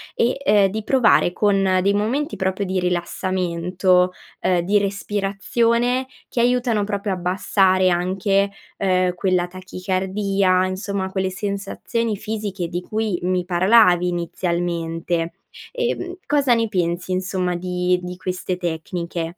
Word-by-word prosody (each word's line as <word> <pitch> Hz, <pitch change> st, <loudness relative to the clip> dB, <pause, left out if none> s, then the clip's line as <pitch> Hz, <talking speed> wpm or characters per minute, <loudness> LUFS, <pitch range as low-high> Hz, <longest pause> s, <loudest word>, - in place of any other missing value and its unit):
e, 240 Hz, +3 st, +1 dB
uhm, 205 Hz, -7 st, +5 dB
di 215 Hz, +3 st, -4 dB
provare 230 Hz, -7 st, +4 dB
con 195 Hz, -2 st, +2 dB
dei 200 Hz, +1 st, +3 dB
momenti 250 Hz, +10 st, -1 dB
proprio 190 Hz, +1 st, -1 dB
di 185 Hz, 0 st, -1 dB
rilassamento, 180 Hz, 0 st, 0 dB, 0.3 s
uhm, 180 Hz, -2 st, +2 dB
di 200 Hz, +4 st, +2 dB
respirazione, 220 Hz, +5 st, 0 dB, 0.2 s
che 240 Hz, -, 0 dB
aiutano 240 Hz, -3 st, +2 dB
proprio 200 Hz, 0 st, -2 dB
a -, -, 0 dB
abbassare 185 Hz, +1 st, +2 dB
anche, 190 Hz, +3 st, +1 dB, 0.3 s
uhm, 185 Hz, -2 st, +1 dB
quella 180 Hz, -1 st, +1 dB
tachicardia, 185 Hz, +1 st, 0 dB
insomma, 190 Hz, 0 st, -3 dB
quelle 190 Hz, -1 st, -1 dB
sensazioni 205 Hz, +3 st, -3 dB
fisiche 205 Hz, -4 st, -4 dB
di 175 Hz, +2 st, -4 dB
cui 215 Hz, -1 st, -2 dB
mi 180 Hz, 0 st, 0 dB
parlavi 180 Hz, 0 st, +4 dB
inizialmente. 170 Hz, -1 st, -2 dB, 0.4 s
Uhm, 480 Hz, -7 st, -2 dB
cosa 280 Hz, -3 st, +3 dB
ne 230 Hz, -1 st, +1 dB
pensi 180 Hz, -2 st, -1 dB
insomma, 185 Hz, -1 st, -1 dB
di 180 Hz, 0 st, 0 dB
di 180 Hz, 0 st, -7 dB
queste 185 Hz, 0 st, -3 dB
tecniche? 170 Hz, 0 st, -4 dB
185 Hz, 125 wpm, -21 LUFS, 180-205 Hz, 0.4 s, uhm